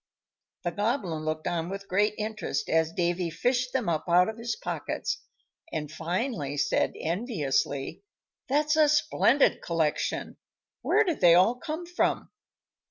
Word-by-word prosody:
The 175 - -1
Goblin 195 - -1
looked 155 0 -2
on 170 0 -1
with 195 +1 -6
great 205 +3 +2
interest 215 -9 -3
as 160 0 +2
Davy 175 0 0
fished 245 +9 0
them 255 -5 -1
up 160 -3 0
out 180 +3 +5
of 220 +1 -7
his 230 0 -2
pockets, - - -3 0.5
and 150 -1 -4
finally 165 - -2
said, - - +1
enviously, 155 - -1 0.5
"That's 300 +2 +2
a 310 -1 +5
splendid 295 -2 +3
collection; 160 -3 -1 0.4
where 440 - +3
did 345 -7 -2
they 170 -2 +7
all 185 +7 +5
come 310 +7 -5
from?" 355 +1 -1
190 Hz, 140 wpm, -28 LUFS, 165-255 Hz, 0.5 s, they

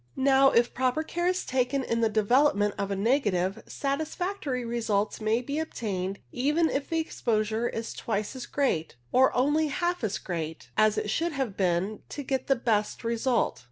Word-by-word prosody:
Now, 270 0 +5
if 235 -1 +2
proper 260 +5 +1
care 345 +2 -2
is 365 0 0
taken 260 +1 0
in 230 -2 -1
the 225 - +3
development 215 -1 +3
of 200 - -3
a 200 - -1
negative, 200 -3 +1
satisfactory 295 -1 -2
results 220 -3 -1
may 220 +3 +1
be 285 +4 -2
attained 200 -11 -3
even 300 +6 +1
if 275 0 -2
the 330 - 0
exposure 225 -6 0
is 225 0 -5
twice 215 +2 -3
as 255 -2 -6
great, 210 - 0 0.2
or 260 +1 +5
only 295 +5 +2
half 345 +2 -1
as 210 -3 0
great, 165 -3 -5
as 215 0 +3
it 210 - -1
should 335 +4 0
have 265 -8 -2
been 190 +2 0
to 285 - -5
get 265 -1 -2
the 270 - +4
best 220 -4 0
result. 235 +1 0
240 Hz, 175 wpm, -28 LUFS, 210-280 Hz, 0.2 s, Now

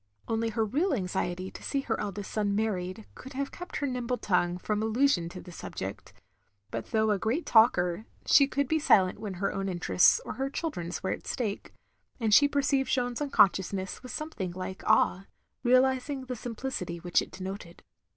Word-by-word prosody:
Only 225 0 0
her 220 0 0
real 295 - +1
anxiety 185 -2 -2
to - - -11
see 275 - -1
her - - -2
eldest 200 0 -4
son 205 -2 0
married, 205 -1 -2
could 265 - -11
have 275 +1 -3
kept 355 0 -9
her 285 - -1
nimble 250 -2 -2
tongue 180 -4 +1
from 210 +3 -2
allusion 220 -6 +2
to 180 - -9
the 180 - -11
subject; 95 - -7 0.6
but 115 - -4
though 220 -1 +2
a 205 - +1
great 235 - -1
talker, 215 -3 +4 0.2
she 280 - +6
could 280 0 -1
be 315 +3 +1
silent 195 -11 +4
when 205 -4 -5
her 195 +2 -1
own 195 0 -2
interests 180 - +4
or - - -4
her 270 +1 -2
children's 180 - -4
were 190 - 0
at - - -5
stake; 215 -5 -3 0.5
and 220 -3 +1
she 285 +7 +8
perceived 280 -1 +1
Jeanne's 245 0 0
unconsciousness 195 -7 +2
with 255 - -8
something 235 - -4
like 185 +1 -6
awe, 190 +2 +3 0.3
realising 260 +2 +2
the 250 0 -4
simplicity 230 -7 -4
which 175 +1 +1
it - - -7
denoted. 190 -2 -8
220 Hz, 180 wpm, -29 LUFS, 185-265 Hz, 0.6 s, she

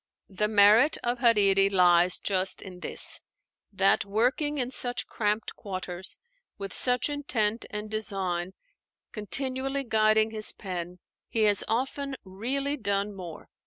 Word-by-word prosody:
The 210 +2 -1
merit 215 +7 +5
of 240 0 -2
Hariri 200 -5 +3
lies 180 -2 +3
just 190 -1 -1
in 185 -2 -11
this: - - -1 0.5
that 195 0 +2
working 250 +9 0
in 250 -2 -2
such 245 -1 -1
cramped 210 0 -2
quarters, 185 -2 -7 0.4
with 195 -2 -7
such 250 -1 +4
intent 240 -7 -2
and 210 0 -6
design 190 -4 -2 0.6
continually 265 +5 +2
guiding 220 -1 +2
his 215 -1 -1
pen, 180 -2 -6 0.3
he 225 - 0
has 205 -2 +3
often 270 +4 -3
really 265 +10 -2
done 200 -3 -2
more. 175 -5 -10
210 Hz, 125 wpm, -27 LUFS, 195-245 Hz, 0.6 s, merit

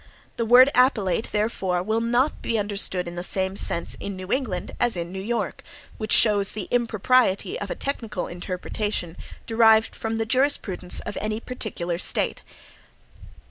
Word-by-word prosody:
The 230 - -1
word 255 +4 +7
"appellate," 225 -6 +2
therefore, 195 -4 -1
will 220 +3 0
not 240 +5 0
be 230 - -1
understood 200 -3 -1
in 170 - -6
the 175 - -5
same 190 +1 0
sense 170 -3 +1
in 200 - -5
New 185 +1 -8
England 220 -10 -2
as 240 -6 +1
in 170 0 -4
New 190 0 -5
York, 230 +3 -3 0.4
which 215 -1 -4
shows 205 -3 +5
the 215 - -4
impropriety 245 - +1
of - - -5
a - - -3
technical 235 - -4
interpretation 180 0 -4 0.3
derived 225 -1 +4
from 225 0 -3
the 225 - -1
jurisprudence 225 -8 +1
of - - -5
any 215 +1 -2
particular 185 -9 -4
State. - - +1
215 Hz, 155 wpm, -24 LUFS, 185-235 Hz, 0.4 s, word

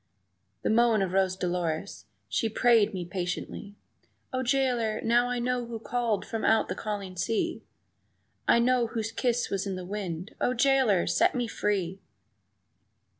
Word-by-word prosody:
The - - +1
moan 225 -2 +4
of 185 - -2
Rose 190 -1 +2
Dolores 175 -3 -3 0.2
(she 225 - 0
prayed 225 -1 +4
me 185 -4 -4
patiently) 180 +3 -5 0.6
"O 255 - 0
jailer, 245 -4 +1
now 240 +2 +3
I 245 - -1
know 245 0 0
who 230 -1 -5
called 225 -2 -1
from 225 - -4
out 220 0 +3
the - - 0
calling 200 -3 -5
sea, 215 +5 -1 0.9
I - - +6
know 245 0 +3
whose 225 -1 -3
kiss 245 -1 0
was 195 0 -1
in 195 - -2
the 185 -1 -6
wind 185 -2 -5
O 250 - +1
jailer, 255 -7 +3
set - - +2
me 245 -1 0
free!" 195 -4 -2
220 Hz, 155 wpm, -28 LUFS, 190-240 Hz, 0.9 s, I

